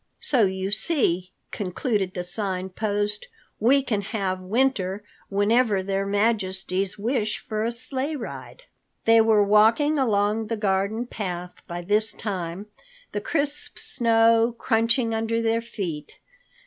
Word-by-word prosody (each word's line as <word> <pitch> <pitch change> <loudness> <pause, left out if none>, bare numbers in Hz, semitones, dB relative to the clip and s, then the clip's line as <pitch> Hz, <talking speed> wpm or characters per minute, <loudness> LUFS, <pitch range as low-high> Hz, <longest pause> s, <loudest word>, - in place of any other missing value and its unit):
"So 245 -7 +3
you 190 +1 -2
see," 195 - +1 0.2
concluded 195 0 -2
the 180 - -2
Sign 190 0 -3
Post, 205 +1 -2 0.3
"we 265 +5 +4
can 215 -6 -1
have 195 -3 -2
winter 205 -2 0 0.3
whenever 205 0 +2
Their 195 +1 -1
Majesties 195 -3 0
wish 215 0 -1
for 215 -1 -4
a 230 - 0
sleigh 260 +5 -3
ride." 295 - -8 0.4
They 225 0 +6
were 220 -2 +4
walking 225 +9 +4
along 215 -2 +1
the 230 - -2
garden 200 +3 0
path 180 -6 -6
by 175 -1 -5
this 210 +4 +2
time, 185 -2 -4 0.5
the - - -3
crisp 290 -2 -2
snow 230 0 +3
crunching 230 0 +1
under 225 +1 0
their 230 0 +1
feet. 190 -10 -6
210 Hz, 130 wpm, -24 LUFS, 195-230 Hz, 0.5 s, They